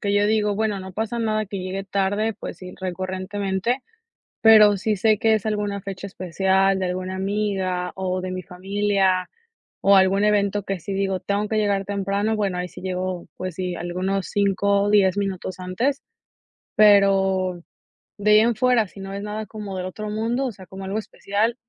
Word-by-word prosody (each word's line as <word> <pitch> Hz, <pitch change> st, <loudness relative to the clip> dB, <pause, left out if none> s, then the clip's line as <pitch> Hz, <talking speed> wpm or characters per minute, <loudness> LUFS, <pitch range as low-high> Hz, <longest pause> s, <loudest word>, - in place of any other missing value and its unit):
que 200 Hz, -3 st, -1 dB
yo 205 Hz, 0 st, +3 dB
digo, 210 Hz, -1 st, +2 dB
bueno, 210 Hz, -1 st, 0 dB
no 190 Hz, 0 st, -8 dB
pasa 220 Hz, +4 st, -3 dB
nada 215 Hz, -2 st, 0 dB
que 195 Hz, +1 st, -5 dB
llegue 185 Hz, +1 st, -4 dB
tarde, 200 Hz, +3 st, 0 dB
pues -, -, -8 dB
sí 180 Hz, -1 st, -9 dB
recurrentemente, 190 Hz, +5 st, -2 dB, 0.6 s
pero 215 Hz, -2 st, +7 dB
si 215 Hz, +3 st, 0 dB
sé 215 Hz, +2 st, +3 dB
que 220 Hz, +1 st, +3 dB
es 215 Hz, -1 st, 0 dB
alguna 205 Hz, -2 st, -2 dB
fecha 195 Hz, 0 st, -6 dB
especial 190 Hz, +1 st, +1 dB
de 185 Hz, -, -1 dB
alguna 185 Hz, +1 st, -3 dB
amiga 190 Hz, -2 st, -1 dB
o 185 Hz, -1 st, -2 dB
de 185 Hz, 0 st, -4 dB
mi 185 Hz, 0 st, -4 dB
familia 190 Hz, 0 st, 0 dB, 0.5 s
o 200 Hz, 0 st, +6 dB
algún 195 Hz, +1 st, +4 dB
evento 205 Hz, -1 st, +2 dB
que 195 Hz, -2 st, -3 dB
sí 195 Hz, -, -5 dB
digo, 195 Hz, -1 st, -1 dB
tengo 200 Hz, +1 st, -1 dB
que 220 Hz, -, -1 dB
llegar 200 Hz, -2 st, +1 dB
temprano, 200 Hz, +2 st, -1 dB
bueno, 200 Hz, -4 st, -1 dB
ahí 180 Hz, 0 st, -3 dB
sí -, -, -12 dB
llego, 185 Hz, -1 st, -3 dB
pues 185 Hz, -2 st, -5 dB
sí, 180 Hz, -1 st, -2 dB
algunos 185 Hz, +3 st, -2 dB
5 200 Hz, 0 st, +2 dB
o 205 Hz, -, +1 dB
10 200 Hz, -2 st, +4 dB
minutos 190 Hz, -2 st, -3 dB
antes, 235 Hz, +10 st, -1 dB, 0.7 s
pero 195 Hz, -3 st, +4 dB, 0.6 s
de 210 Hz, +1 st, +2 dB
ahí 210 Hz, -, +8 dB
en 230 Hz, +1 st, +3 dB
fuera, 240 Hz, -1 st, +3 dB
si 195 Hz, -, -14 dB
no 195 Hz, 0 st, -7 dB
es 200 Hz, -, -4 dB
nada 210 Hz, +1 st, -4 dB
como 205 Hz, -2 st, -7 dB
del 180 Hz, -, -3 dB
otro 210 Hz, +3 st, -5 dB
mundo, 230 Hz, +5 st, -1 dB
o 245 Hz, -, -3 dB
sea, 190 Hz, -2 st, -13 dB
como 190 Hz, +2 st, -9 dB
algo 195 Hz, +2 st, -2 dB
especial, 220 Hz, +1 st, -1 dB
195 Hz, 190 wpm, -23 LUFS, 185-210 Hz, 0.7 s, ahí